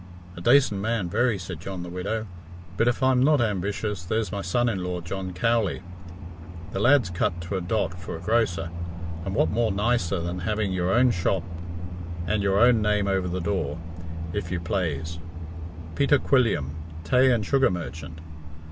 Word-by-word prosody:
"A 85 - -8
dacent 120 -2 +4
man, 110 -4 0
very," 120 +1 +2
said 90 -3 -6
John 90 +1 -5
the - - -7
Widow; 100 +5 -2 0.5
"but 115 - +2
if 120 +2 +1
I'm 130 -1 +4
not 145 +2 +5
ambitious, 105 -2 -1
there's 110 +2 -1
my 100 - -2
son 120 +7 +1
in 95 -6 -1
law, 90 0 -2
John 95 +2 -4
Cowley. 105 +1 +1 0.9
The 95 - -3
lad's 120 -4 +4
cut 90 0 0
to 85 +4 -4
a - - -2
dot 90 -1 -1
for 85 - -6
a - - -6
grocer, 90 -4 +1 0.5
and 95 +2 -3
what 80 - +3
more 115 0 +2
nicer 100 -3 +1
than 85 +2 -3
having 105 +1 -1
your 90 0 0
own 125 +4 +5
shop 90 -2 0 0.8
and 100 +4 +1
your 100 -1 +2
own 120 -1 +6
name 105 -1 +2
over 95 -2 +1
the 90 +1 -2
door, 85 -5 -1 0.6
if 95 -4 -3
you 90 - -1
plaze 85 -2 -2 0.4
' 80 0 -10
Peter 140 +1 +4
Quilliam, 115 - +2 0.3
tay 125 +11 +4
and 115 -4 +1
sugar 135 +2 +4
merchant!' 80 -2 -6
95 Hz, 175 wpm, -26 LUFS, 85-115 Hz, 0.9 s, own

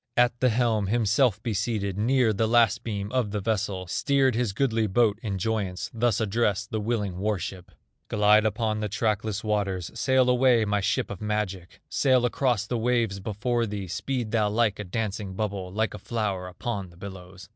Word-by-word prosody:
At 120 -1 +3
the 130 - +3
helm 110 -3 +1
himself 110 0 +2
he 115 - -1
seated, 100 -1 -1
Near 115 +2 +2
the 110 +2 +1
last 115 -1 +3
beam 105 -2 -4
of 125 -5 0
the 105 +1 -2
vessel, 95 -3 -1
Steered 135 +7 +2
his 115 -2 0
goodly 115 -1 +1
boat 105 +1 +2
in 100 -4 -3
joyance, 95 -2 -2
Thus 115 -2 +1
addressed 110 -1 0
the 110 - -1
willing 105 -4 -2
war 105 +1 0
ship: 90 0 -7 0.4
"Glide 105 0 +4
upon 110 0 0
the 105 -1 -2
trackless 105 0 -1
waters, 100 -5 -1
Sail 130 -1 +2
away, 125 -2 +4
my 105 -1 0
ship 100 - 0
of 100 - -7
magic, 105 -4 -3
Sail 130 -3 +3
across 120 -3 +1
the 120 +2 -2
waves 115 -4 +1
before 115 +4 -1
thee, 100 -2 -5
Speed 120 +5 -3
thou 110 -3 +2
like 105 -1 +1
a - - -3
dancing 100 -1 -3
bubble, 100 -3 -3
Like 110 +3 -1
a 105 - -7
flower 100 -4 -2
upon 100 +1 -4
the 85 - -18
billows!" 95 0 -10
105 Hz, 185 wpm, -26 LUFS, 100-115 Hz, 0.4 s, Glide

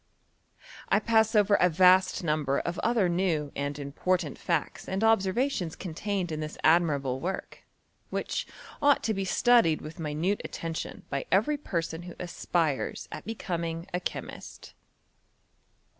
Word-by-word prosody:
I - - +4
pass 220 0 +3
over 205 -1 +4
a 180 -2 +5
vast 185 +2 +4
number 150 -4 +1
of 170 +1 -3
other 230 -5 +2
new 170 -5 0
and 145 0 -3
im 140 -1 -6
portant 175 -1 0
facts 170 -4 -2
and 190 +3 -1
observations 220 - +1
contained 185 +1 -3
in 155 - -3
this 155 0 -5
ad 165 +2 +6
mirable 140 -5 -1
work, 185 +6 -5 0.5
which - - -3 0.3
ought 285 -1 +4
to 220 - +1
be 195 -1 -2
studied 230 -6 +4
with 155 +2 -9
mi 150 -2 -3
nute 185 +7 0
attention 165 -1 -5
by - - -2
every 300 - +3
person 170 - -3
who 175 0 -9
aspires 170 -4 -1
at - - -7
be 225 - -4
coming 170 -4 -3
a 180 - +1
chemist. - - -7
175 Hz, 150 wpm, -28 LUFS, 155-200 Hz, 0.5 s, ad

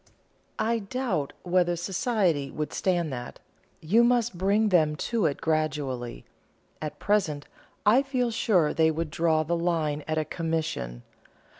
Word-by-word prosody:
"I 230 +1 +1
doubt 220 - -2
whether 175 -1 +2
society 175 - 0
would 150 +2 -4
stand 175 -6 0
that. 120 -1 -6 0.4
You 210 +10 +4
must 240 -3 +2
bring 200 +4 +2
them 155 -5 +3
to 220 +2 0
it 140 - -3
gradually. 150 -6 -2 0.6
At 155 -1 -5
present, 165 -9 0 0.4
I 225 +6 +6
feel 255 -3 -1
sure 185 -8 +2
they 160 -1 +3
would 160 0 -2
draw 160 -1 +2
the 170 +3 -1
line 160 -4 0
at 155 0 -1
a 155 - 0
'commission.' 160 - -3
165 Hz, 140 wpm, -27 LUFS, 150-205 Hz, 0.6 s, I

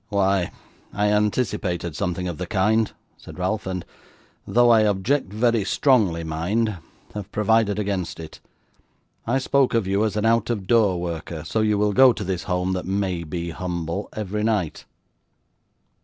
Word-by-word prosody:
'Why, 100 -3 +1 0.4
I 105 0 +1
anticipated 105 - 0
something 90 +3 -2
of 85 -2 -5
the 90 - -4
kind,' 110 +3 +2 0.3
said - - -12
Ralph; 95 +3 -2
'and 90 -2 -4 0.6
though 120 0 +4
I 115 - +6
object 105 +3 +1
very 115 0 +2
strongly, 100 - +2
mind 90 +6 -1 0.3
have 105 -3 -7
provided 105 -1 +2
against 95 -5 -2
it. 80 -1 -9 0.9
I 120 +3 +2
spoke 135 -1 +2
of 115 -4 +2
you 100 +2 +1
as 110 -1 -1
an 105 - 0
out 115 0 +2
of 105 -5 -2
door 105 -4 +3
worker; 85 -2 -5
so 110 +7 -1
you 105 -1 +2
will 105 0 +1
go 130 +2 +7
to 105 - -5
this 95 -2 -3
home 90 0 -1
that 90 -1 -4
may 95 -3 -1
be 85 +1 -4
humble, 85 +2 -4
every 105 0 -3
night. 105 -8 -1
100 Hz, 160 wpm, -23 LUFS, 90-110 Hz, 0.9 s, go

